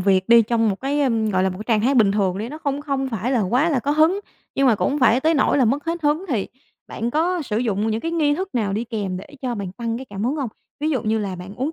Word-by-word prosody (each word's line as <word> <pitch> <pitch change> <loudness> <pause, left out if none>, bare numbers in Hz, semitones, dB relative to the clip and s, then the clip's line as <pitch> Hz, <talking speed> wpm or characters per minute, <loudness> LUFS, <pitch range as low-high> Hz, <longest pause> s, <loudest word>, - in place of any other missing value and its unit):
việc 190 +1 +2
đi 235 0 +8
trong 225 0 +1
một 195 -1 -2
cái, 285 +2 0
ưm, 225 -5 +1
gọi 185 -2 +1
là, 190 - +2
một 185 - -7
cái 215 - -6
trạng 225 -3 +2
thái 275 - +3
bình 210 -6 +4
thường 195 -3 0
đi 220 +3 -4
nó 305 +3 -8
không 285 -2 -2
không 275 -2 -2
phải 235 +3 -2
là 245 - +2
quá 250 - +2
là 280 -6 +1
có 280 - -1
hứng, 315 +7 +3 0.3
nhưng 275 - +2
mà 240 - +5
cũng - - 0
hông 290 - -1
phải 250 0 +4
tới 320 +2 +2
nỗi 285 0 +2
là 260 - +4
mất 275 +7 0
hết 335 0 -3
hứng 300 +5 +1
thì 225 -9 -1 0.4
bạn 235 +1 -3
có 340 +4 0
sử 220 -5 -2
dụng 220 -2 0
những 220 +1 -1
cái 330 - -3
nghi 300 -3 +2
thức 375 -1 -5
nào 210 -5 0
đi 220 +4 -1
kèm 205 -5 -3
để 185 - -8 0.2
cho 250 -2 -1
bạn 195 -4 -5
tăng 230 +1 -3
cái 265 - -7
cảm 205 -3 -5
hứng 275 +5 0
hông? 270 -5 -2 0.3
Ví 305 +1 0
dụ 260 -7 0
như 220 0 0
là 195 -3 -3
bạn 180 +3 -9
uống 270 +8 -2
240 Hz, 310 wpm, -22 LUFS, 210-290 Hz, 0.4 s, đi